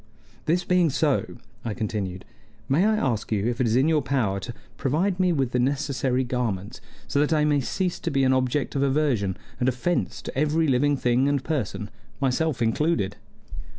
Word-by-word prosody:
"This 175 +3 +2
being 180 -2 +3
so," 145 -2 0 0.3
I 110 -3 -3
continued, 100 -5 -3 0.4
"may 155 +9 +3
I 220 - +3
ask 120 - -1
you 105 -1 +1
if 120 +1 -1
it 125 - +2
is 110 - +1
in 130 +4 +4
your 160 -2 +3
power 125 -8 0
to 120 +5 -6 0.2
provide 175 +8 0
me 185 -1 +3
with 135 -6 0
the 125 - +1
necessary 130 -1 0
garments, 115 -5 -3 0.3
so 140 - 0
that 150 +2 +2
I 150 -1 +3
may 145 -2 +2
cease 180 +7 -2
to - - -2
be 135 -1 +1
an 130 0 +4
object 130 +2 0
of 135 - 0
aversion 135 -9 +1 0.2
and 125 - +2
offense 130 +8 -1
to - - -7
every 155 +3 +2
living 140 +2 +2
thing 125 +2 +2
and 140 -2 0
person, 125 -8 -3 0.3
myself 135 0 0
included?" 115 - 0
135 Hz, 185 wpm, -25 LUFS, 120-150 Hz, 0.4 s, in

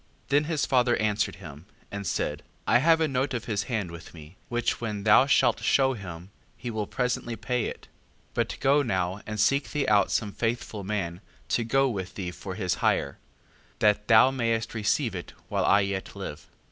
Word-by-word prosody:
Then 145 +2 +3
his 155 -2 0
father 125 -2 +3
answered 105 -5 0
him, 80 -2 -11 0.2
and 100 -2 -5
said: 75 -1 -1 0.2
I 120 - +4
have 160 +4 +4
a 160 - +2
note 135 -1 -1
of 120 -1 -4
his 105 -3 -1
hand 105 -8 -2
with 85 0 -11
me, 80 +2 -12
which 120 0 -1
when 105 -3 -3
thou 110 +5 +6
shalt - - +3
shew 135 -1 +3
him, 95 -4 -9 0.3
he 120 - -5
will 110 -2 -3
presently 125 -2 -2
pay 125 0 -1
it. - - -7 0.4
5:4. - - -36
But - - -1
go 140 +2 +4
now, 95 -5 -1
and 110 0 -4
seek 140 +5 +2
thee 150 -2 -1
out 105 -2 +4
some 105 -2 0
faithful 115 -2 -3
man, 95 -3 -3 0.3
to 120 - +1
go 135 +4 +2
with 95 -7 -4
thee 90 -3 -4
for 95 +1 -7
his 95 -4 0
hire: 70 - +1 0.6
that 105 0 +2
thou 115 +3 +7
mayst 115 -3 -1
receive 115 +2 0
it, 90 -2 -7 0.2
while - - 0
I 100 - +5
yet 100 0 -3
live. 95 -7 -6
5:5. - - -20
110 Hz, 195 wpm, -27 LUFS, 95-125 Hz, 0.6 s, thou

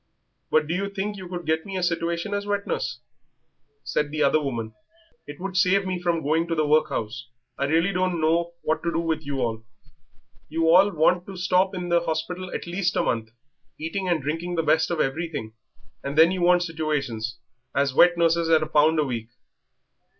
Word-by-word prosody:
"But 155 -1 +3
do 160 - -3
you 195 +2 -1
think 200 +1 -3
you 190 -2 -8
could 175 -1 -6
get 160 0 0
me 195 -1 -5
a 185 - -2
situation 170 +3 -1
as 205 0 -2
wet 205 0 -1
nurse?" 130 -1 -3 0.8
said 150 +1 -1
the 150 +1 0
other 155 - +3
woman; 115 -6 -4 0.5
"it 145 0 -9
would 190 0 -5
save 190 +1 +3
me 185 -1 -3
from 170 -2 0
going 160 +4 +1
to 165 - -1
the 155 -1 +1
workhouse." 120 -6 0 0.3
"I 140 - -1
really 165 +6 +2
don't 180 -2 0
know 170 +2 +1
what 155 - 0
to 170 - -1
do - - 0
with 160 -2 -1
you 140 -2 -2
all; 110 -1 -3 0.9
you 165 0 0
all 190 +4 +7
want 175 0 +2
to 195 -1 -8
stop 185 +1 +2
in 180 -1 -4
the 170 0 +4
hospital 170 +3 -3
at - - -4
least 180 +2 -1
a - - +2
month, 115 -2 -1 0.5
eating 180 +4 -3
and 170 -5 +1
drinking 165 +5 -3
the 165 - 0
best 160 +1 +2
of 170 - -2
everything, 140 -6 -2 0.5
and 140 +2 -4
then 165 +2 +7
you 185 -1 -2
want 175 0 +4
situations 140 -8 -3 0.4
as 140 -1 +1
wet 175 +5 +5
nurses 170 0 +2
at 160 -1 +4
a - - -3
pound 155 +1 +3
a 155 - +3
week." 115 -4 -4
165 Hz, 200 wpm, -25 LUFS, 150-180 Hz, 0.9 s, all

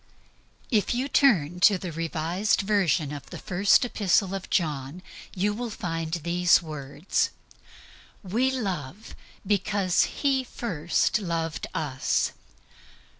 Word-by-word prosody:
If 220 0 +2
you 255 +3 -1
turn 180 - +3
to 195 +2 +6
the 180 -1 -6
Revised 165 +5 0
Version 190 -7 +1
of 145 - -8
the - - -7
First 195 +6 +3
Epistle 195 -4 +1
of 195 -1 -5
John 150 0 -1 0.3
you 210 +5 -1
find 165 -6 -4
these 175 +1 +3
words: 150 0 -2 0.9
"We 225 +8 +1
love 195 - -4 0.3
because 200 -2 +2 0.2
He 270 -2 +3
first 180 -7 -1
loved 165 -4 -3
us." 145 -5 0
180 Hz, 110 wpm, -26 LUFS, 165-210 Hz, 0.9 s, to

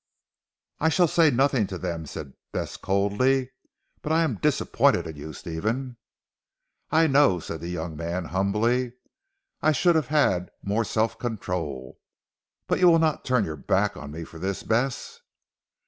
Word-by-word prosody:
"I 160 - +3
shall 175 +2 +4
say 165 0 +4
nothing 130 -4 +2
to 95 - -5
them," 85 -3 -4
said 70 -1 -7 0.2
Bess - - -4
coldly, 125 +7 +1 0.5
"but 150 - -3
I 165 +1 +4
am 130 -10 -1
disappointed - - +2
in 80 - -7
you 75 +2 -8
Stephen." 110 - -3 0.9
"I 160 +1 +4
know," 140 - +4
said 80 -1 -7
the 85 - -5
young 85 -2 -4
man 85 +3 -3
humbly, 110 +8 0 0.7
"I 155 - +4
should 175 +5 +3
have 155 -5 +1
had 95 -12 +2
more 105 +3 0
self 110 +2 0
control. 85 - -4 0.7
But - - 0
you 180 - +6
will 165 - +6
not 160 -2 +1
turn 125 -5 +2
your 80 - -5
back 100 +9 0
on 70 - -8
me 80 +3 -6
for 80 0 -11
this 95 +2 -3
Bess?" 120 +4 -1
105 Hz, 160 wpm, -25 LUFS, 85-135 Hz, 0.9 s, you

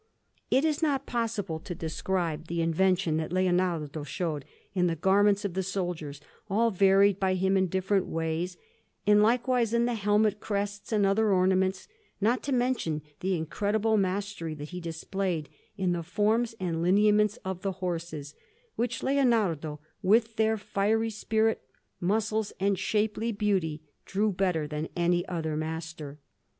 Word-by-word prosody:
It 270 +4 +3
is 310 -1 0
not 280 -4 +1
possible 220 -8 -2
to 175 - -7
describe 165 -1 -2
the 170 0 -1
invention 175 0 +2
that 160 0 -3
Leonardo 175 -5 0
showed 150 0 -3 0.3
in 180 -2 +2
the 165 - 0
garments 200 +4 +3
of 195 - -2
the 190 - 0
soldiers, 175 -6 -3 0.3
all 225 +4 +2
varied 195 0 +4
by 190 -1 +2
him 190 +1 +2
in 190 -1 +3
different 190 +2 0
ways, 165 +2 -2 0.5
and 210 +1 +6
likewise 235 +1 +2
in 235 0 +3
the 245 - 0
helmet 210 -1 +2
crests 205 0 -3
and 210 -2 +3
other 205 +2 +3
ornaments; 185 0 +2 0.3
not 230 +5 +2
to 280 - -4
mention 245 - 0 0.2
the 190 0 0
incredible 210 +7 0
mastery 195 -4 -1
that 150 0 -8
he 180 0 -6
displayed 170 -1 -3 0.3
in 185 -2 +1
the 175 -1 -1
forms 220 +6 +1
and 170 -3 -2
lineaments 210 +4 +4
of 190 -1 -4
the 195 0 -2
horses, 170 -5 -4 0.4
which 240 +1 -2
Leonardo, 210 - +1 0.2
with 220 +3 +3
their 220 0 +2
fiery 220 +2 0
spirit, 220 +1 0 0.4
muscles, 215 +3 0
and 195 -1 +1
shapely 215 +3 0
beauty, 190 -8 0 0.2
drew 210 +2 +1
better 180 -4 0
than 150 +1 -4
any 175 0 +2
other 160 -3 -2
master. 160 -2 -5
190 Hz, 150 wpm, -28 LUFS, 170-215 Hz, 0.5 s, and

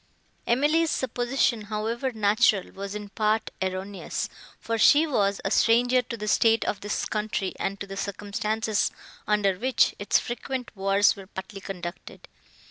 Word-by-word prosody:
Emily's 300 +7 +3
supposition, 245 -3 0
however 225 +5 -2
natural, 215 -2 +2
was 200 +1 -6
in 210 -1 -6
part 215 +1 0
erroneous, 190 +1 -3 0.3
for 230 0 -2
she 295 +8 +6
was 200 -9 +1
a 195 - 0
stranger 245 +3 +4
to 235 -1 -7
the 210 -1 -5
state 225 +1 +3
of 200 - -1
this 205 +1 -2
country 210 -3 -2
and 195 0 -2
to - - -4
the 195 0 -8
circumstances, 205 +2 -1 0.4
under 200 -3 +2
which 255 +1 +3
its 205 - +3
frequent 250 +1 -4
wars 195 +1 +3
were 195 -2 -11
partly 190 +1 -8
conducted. 180 -2 -8
210 Hz, 145 wpm, -26 LUFS, 200-235 Hz, 0.4 s, she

